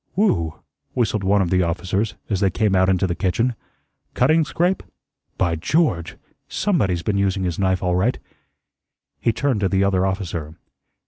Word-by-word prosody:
"Whew!" 85 - +1 0.4
whistled 110 -4 0
one 100 +1 +3
of 85 - -3
the 90 0 +3
officers 90 +4 -1
as 100 -4 -1
they 95 - +3
came 105 -1 +1
out 95 0 +4
into 95 0 +2
the 90 - -1
kitchen, 105 +7 0 0.6
"cutting 160 +1 +4
scrape? 175 +5 0 0.6
By 85 -3 +1
George! 85 - 0 0.3
SOMEBODY'S 100 - 0
been 100 -2 0
using 95 -1 0
his 90 -1 -2
knife 95 -1 +1
all 90 -1 +1
right." 105 +8 +1 1.0
He 115 - +2
turned 130 -1 0
to 100 -2 +1
the 95 +1 +2
other 95 -2 +2
officer. 85 -5 -3
95 Hz, 165 wpm, -22 LUFS, 90-110 Hz, 1.0 s, out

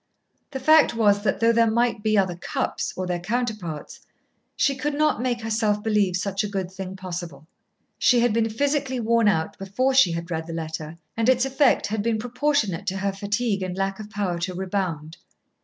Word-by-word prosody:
The 270 -2 -5
fact 310 -1 +5
was 205 -3 +3
that 200 - 0
though 230 0 +5
there 230 -1 +3
might 235 0 +1
be 215 0 +2
other 190 -3 +2
Cupps, 175 - -3
or 185 - -2
their 180 -1 -2
counterparts, 210 -6 -4 0.6
she 275 - +2
could 285 +2 -2
not 305 -4 +2
make 245 -2 -1
herself 215 -2 0
believe 210 -4 +2
such 195 +2 -1
a - - -2
good 190 -2 -3
thing 190 0 -7
possible. 175 -6 -7 0.5
She 245 - +4
had 240 -2 +2
been 225 0 +1
physically 275 +2 -1
worn 230 -1 +2
out 160 -6 0
before 225 +8 0
she 260 -10 +5
had 170 +1 -5
read 160 -1 -3
the 165 - -6
letter, 160 0 -5 0.2
and 225 +2 +1
its 255 0 +3
effect 270 +1 +3
had 215 0 -2
been 225 +1 0
proportionate 245 - -1
to 190 - -1
her 195 +1 -1
fatigue 205 +1 -1
and 185 0 -4
lack 195 +1 -2
of 210 -1 -8
power 195 -5 -2
to 180 +1 -3
rebound. 180 -5 -3
210 Hz, 195 wpm, -24 LUFS, 185-235 Hz, 0.6 s, fact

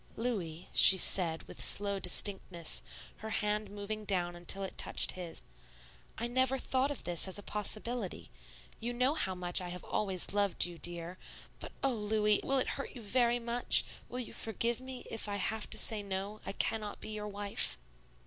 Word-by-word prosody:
"Louis," 185 -9 -3
she 190 - +9
said, 170 -3 +3
with - - -5
slow 200 -1 +3
distinctness, 180 -2 +1 0.4
her 220 - -7
hand 210 -1 -1
moving 205 +1 -5
down 180 -4 +1
until 175 +3 -1
it 190 - -6
touched - - +2
his, 175 -3 -7 0.7
"I 235 - -2
never 260 +2 +1
thought 260 +1 0
of 290 - -5
this 175 +1 +3
as 190 - +1
a 205 - -4
possibility. 210 - -3 0.5
You 240 +2 -3
know 255 +4 +2
how 190 -12 -2
much 180 0 +1
I 180 - -5
have 180 0 -7
always 190 -3 -1
loved 205 -2 +2
you, 175 -1 -8
dear; 175 +1 -3 0.4
but - - -7
oh, 270 -1 +2
Louis, 210 -1 +2
will 275 - +2
it 260 - +2
hurt - - -9
you 245 - -8
very 240 +2 +2
much, 240 0 +4 0.3
will 250 - -5
you 245 - -5
forgive 230 +2 -2
me 260 -1 -8
if 225 -2 -4
I 205 - -2
have 215 +2 -2
to - - +4
say 220 -2 +3
no, 200 +1 -4
I - - -2
cannot 210 0 -2
be - - -8
your 210 -1 -5
wife?" 205 - -1
205 Hz, 185 wpm, -33 LUFS, 185-235 Hz, 0.7 s, she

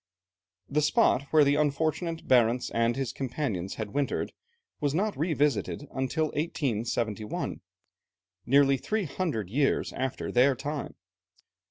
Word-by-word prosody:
The 150 +2 +1
spot 140 -2 +3
where 155 -1 +6
the 140 0 +3
unfortunate 155 +3 0
Barentz 125 -1 +3
and 115 0 +2
his 130 -2 -2
companions 115 - -3
had 105 -2 -5
wintered 145 -1 -1 0.5
was 145 -1 0
not 205 +4 0
revisited 145 - 0
until 150 +4 0
1871, 115 -7 -2 0.9
nearly 140 +1 +5
three 215 - -1
hundred 140 - -3
years 140 +3 +1
after 130 0 -3
their 130 +2 +4
time. 145 +3 -5
140 Hz, 120 wpm, -28 LUFS, 120-150 Hz, 0.9 s, where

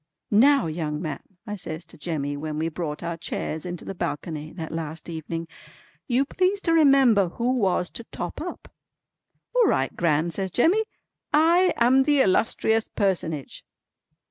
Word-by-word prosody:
"Now 270 +6 +5
young 155 -2 -3
man," 155 -3 -4 0.2
I 210 - -4
says 170 -3 -6
to 165 - -13
Jemmy 145 -3 -3
when 150 +1 -4
we 160 +1 0
brought 155 -2 -5
our 170 -1 -3
chairs 160 0 -4
into 175 -1 -6
the - - -5
balcony 155 -3 -4
that 165 -3 -6
last 160 0 -5
evening, 165 0 -5 0.6
"you 255 +2 +2
please 370 +6 +1
to 330 - +1
remember 270 - +5
who 240 +7 -1
was 190 -7 +1
to 235 - -8
'top - - -6
up.'" - - -7 0.8
"All - - +4
right - - +1
Gran" 165 0 +1
says 190 +2 -3
Jemmy. 355 - +3 0.5
"I 335 +4 +4
am 250 +3 +5
the 290 +1 +3
illustrious 220 +2 +2
personage." 165 - -2
180 Hz, 155 wpm, -25 LUFS, 160-260 Hz, 0.8 s, Now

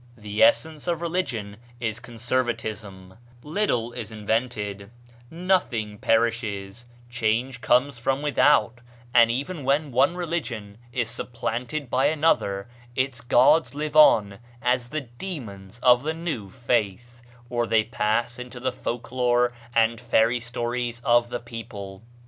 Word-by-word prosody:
The 105 -1 -4
essence 155 +7 +3
of 170 -2 0
religion 135 - -3 0.2
is 115 -1 -2
conservatism; 110 -5 -4 0.2
little 150 - -1
is 110 -2 -6
invented; 105 -2 -2 0.4
nothing 160 - 0
perishes; 115 -1 0 0.2
change 120 +1 -1
comes 125 +1 +2
from 135 +4 0
without; 145 -4 +3 0.3
and 115 -1 +7
even 140 +6 -3
when 140 +2 +1
one 135 +7 +3
religion 130 - -4
is 120 -2 -1
supplanted 120 +4 -4
by 130 +2 +3
another 145 -11 +1 0.3
its 130 -2 -1
gods 130 +6 +4
live 150 0 -3
on 105 -10 +6 0.2
as 125 0 0
the 155 +3 -2
demons 120 - -8
of 125 -1 +6
the 155 +3 -2
new 160 - -4
faith, 120 0 -2 0.3
or 120 -1 -1
they 110 -1 +3
pass 120 +4 -1
into 125 0 -8
the 130 +1 -1
folk 120 -1 -5
lore 125 -1 +2 0.2
and 115 0 +3
fairy 120 0 +3
stories 120 0 -3
of 120 0 +3
the 120 - -3
people. 115 -5 -8
120 Hz, 130 wpm, -25 LUFS, 110-135 Hz, 0.4 s, and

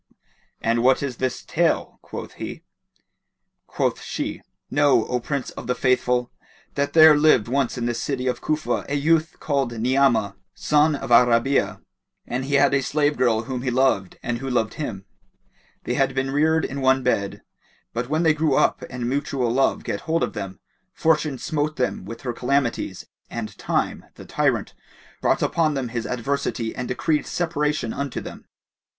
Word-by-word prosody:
"And 115 +1 +1
what 130 +3 +3
is 130 -4 -3
this 130 -1 -2
tale?" - - 0
quoth - - -8
he. - - -6 1.0
Quoth - - -1
she - - -4 0.3
"Know, 145 -5 +4
O 125 - -1
Prince 140 +2 -3
of - - -9
the 125 - 0
Faithful 125 -1 +1 0.4
that 140 0 -1
there 160 -1 +8
lived 145 -7 +4
once 130 0 0
in 120 - -2
the 120 - 0
city 130 +2 -3
of 125 - -1
Cufa 155 0 -1
a 145 - 0
youth 160 +3 +2
called 140 -5 0
Ni'amah, 120 -5 +2 0.2
son 150 0 +3
of 135 - -6
Al 120 +1 +7
Rabi'a, 120 +4 +1 0.4
and 130 +2 -3
he 140 +1 0
had 140 0 +4
a 135 - +3
slave 145 +2 +1
girl 115 -3 +2
whom 125 +1 -4
he 130 - -1
loved 125 -7 +1
and 120 -1 -2
who 135 +1 -4
loved 120 -4 0
him. 100 -11 -5 0.8
They - - -2
had 135 -1 +1
been 135 0 -1
reared 160 +2 +2
in 140 +1 -4
one 130 0 +3
bed; 100 -5 -1 0.5
but 120 +2 -3
when 155 +3 +1
they 160 -2 +5
grew 150 -2 +1
up - - +2
and 125 -1 -4
mutual 135 -2 -1
love 135 +3 +1
get - - -3
hold 165 +1 +2
of - - -2
them, 95 -3 -6 0.3
Fortune 155 -3 +1
smote 155 +2 -2
them 125 -7 -2
with 115 +3 -8
her 125 -2 -3
calamities 125 0 -1 0.2
and 115 -2 -5
Time, - - -1
the - - -11
tyrant, - - 0 0.5
brought - - +2
upon 155 -3 +1
them 130 -3 -2
his 115 -1 -3
adversity 125 -2 -2
and 125 - -4
decreed 150 +4 0
separation 150 -7 -1
unto 140 -2 -3
them. - - -10
130 Hz, 175 wpm, -23 LUFS, 120-145 Hz, 1.0 s, there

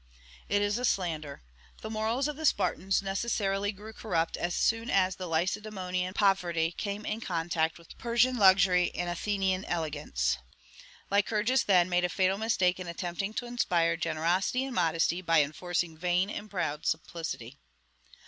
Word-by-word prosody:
It 205 0 +2
is 205 +3 0
a - - -4
slander. 160 - -1 0.4
The 220 - -4
morals 225 +5 0
of 300 - -4
the 315 +1 0
Spartans 190 -1 +1
necessarily 195 0 -1
grew 215 +2 -11
corrupt 170 -7 -1
as 175 0 -2
soon 225 +1 +1
as 190 -1 +2
the 185 - -6
Lacedaemonian 185 +1 -2
poverty 175 -5 +2
came 200 +3 -4
in 220 +2 -3
contact 165 -3 -1
with 170 -1 -15
Persian 240 +2 +2
luxury 190 -3 +5
and 175 0 -2
Athenian 190 +1 -1
elegance. 145 - -1 0.7
Lycurgus, 210 +5 +2
then, 180 -3 +4
made 180 -1 +1
a 180 - +1
fatal 190 +2 +1
mistake 190 -5 +1
in 180 - -6
attempting 175 +4 -4
to 245 - -2
inspire 175 -9 +1
generosity 170 +10 0
and 270 - -5
modesty 165 -1 +1
by 165 -4 +4
enforcing 170 +2 -2
vain 180 +4 0
and 210 0 -6
proud 160 -6 -2
simplicity. 160 -6 -4
185 Hz, 150 wpm, -29 LUFS, 170-205 Hz, 0.7 s, luxury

